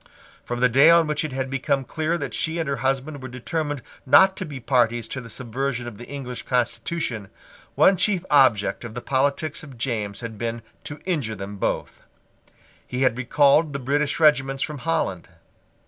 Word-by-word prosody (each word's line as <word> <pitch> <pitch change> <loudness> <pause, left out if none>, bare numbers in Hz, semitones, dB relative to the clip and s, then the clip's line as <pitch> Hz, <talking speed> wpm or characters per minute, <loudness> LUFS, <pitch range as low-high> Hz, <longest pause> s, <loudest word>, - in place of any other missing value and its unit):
From 120 0 -4
the 125 - +6
day 135 +6 +6
on 170 0 +6
which 150 0 -1
it 155 - -4
had 130 0 -2
become 135 +1 0
clear 160 +5 -2
that 145 - -5
she 160 +1 0
and 165 -3 -2
her 140 -1 -1
husband 135 +3 -2
were 130 - -6
determined 145 +2 -4 0.2
not 190 +8 +6
to 185 - -3
be 140 -3 -7
parties 120 -3 +1
to 130 - -4
the 115 - -11
subversion 125 +1 -3
of 110 -3 -9
the 120 - -9
English 130 -3 -6
constitution, 120 -2 -2 0.5
one 190 - +5
chief 190 -1 +2
object 130 -9 +4
of 115 -2 -8
the 125 - -4
politics 140 +4 0
of 140 -5 -12
James 110 -4 -3
had 115 -3 -7
been 115 0 -3 0.2
to 145 - -7
injure 145 -12 -1
them 100 +1 -7
both. - - -3 0.9
He 125 +1 -1
had 130 -3 +3
recalled 140 +4 +3
the - - -1
British 145 +3 -1
regiments 135 -3 +3
from 150 -2 -5
Holland. 155 - -2
135 Hz, 185 wpm, -23 LUFS, 120-150 Hz, 0.9 s, the